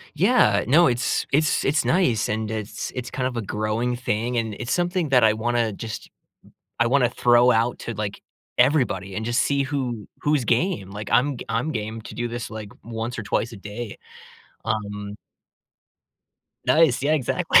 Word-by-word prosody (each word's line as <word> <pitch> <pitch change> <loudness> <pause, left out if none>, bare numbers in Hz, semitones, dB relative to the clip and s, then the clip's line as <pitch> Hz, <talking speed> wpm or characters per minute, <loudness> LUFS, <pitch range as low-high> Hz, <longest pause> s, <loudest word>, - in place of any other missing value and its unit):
Yeah, 170 - +4
uh, - - -5
no, 165 +7 +6
it's 120 0 0
it's 155 +2 +2
it's 150 +3 +2
nice, 130 - +2
and 110 0 -2
it's 110 -1 -4
it's 125 -1 -5
kind 130 -1 -2
of 125 - -7
a 115 - -1
growing 110 +4 -1
thing, 120 0 -1
and 110 -2 -1
it's 120 +2 -3
something 175 -2 0
that 125 -3 +5
I 110 - +6
wanna 115 0 0
just 110 +2 -7 0.7
I 120 - +4
wanna 125 -2 +3
throw 120 0 +4
out 115 +2 +1
to, 120 - -5
like, 105 -1 -4 0.4
everybody 100 -10 +2
and 110 - -3
just 120 +1 +2
see 140 -1 +1
who 130 -6 -3
who's 145 -5 +1
game. 120 - 0
Like, 105 0 -6
I'm 135 0 +3
g - - -8
I'm 120 +8 0
game 110 0 -4
to - - -9
do 120 0 -2
this, 120 -1 -5
like, 110 -2 -7
once 115 +1 -4
or 110 - -4
twice 115 +3 -1
a 110 - -9
day, 105 +2 -7 0.7
um 105 -2 -3 1.5
Nice. 155 -5 +4
Yeah, 150 +2 +2
exactly. 140 -6 +3
120 Hz, 180 wpm, -24 LUFS, 110-130 Hz, 1.5 s, no